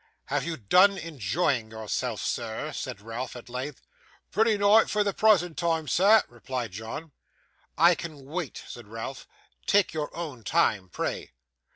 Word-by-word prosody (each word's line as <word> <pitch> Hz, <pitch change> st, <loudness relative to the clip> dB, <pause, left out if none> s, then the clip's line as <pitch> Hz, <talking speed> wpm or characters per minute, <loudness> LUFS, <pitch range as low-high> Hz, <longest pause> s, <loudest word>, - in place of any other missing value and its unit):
'Have 140 Hz, 0 st, 0 dB
you 165 Hz, -1 st, -3 dB
done 185 Hz, -, +5 dB
enjoying 140 Hz, -, -1 dB
yourself, 110 Hz, -1 st, -3 dB
sir?' -, -, -3 dB
said 100 Hz, -, -5 dB
Ralph, 115 Hz, +5 st, -5 dB
at 120 Hz, 0 st, -10 dB
length. 130 Hz, +3 st, -5 dB, 0.5 s
'Pratty 220 Hz, +1 st, +3 dB
nigh 205 Hz, +2 st, +6 dB
for 210 Hz, 0 st, +1 dB
the 200 Hz, -1 st, 0 dB
prasant 185 Hz, -7 st, +3 dB
time, 165 Hz, -3 st, 0 dB
sir,' 205 Hz, +8 st, +5 dB
replied 120 Hz, -1 st, -5 dB
John. 110 Hz, -, -7 dB, 0.7 s
'I 170 Hz, +3 st, +7 dB
can 155 Hz, -5 st, -7 dB
wait,' 160 Hz, +1 st, -5 dB
said 120 Hz, -3 st, -10 dB
Ralph. 115 Hz, +5 st, -7 dB, 0.4 s
'Take 200 Hz, -5 st, +3 dB
your 150 Hz, -2 st, -2 dB
own 145 Hz, -9 st, -6 dB
time, 100 Hz, -2 st, +2 dB
pray. -, -, -4 dB
150 Hz, 150 wpm, -27 LUFS, 120-180 Hz, 0.7 s, I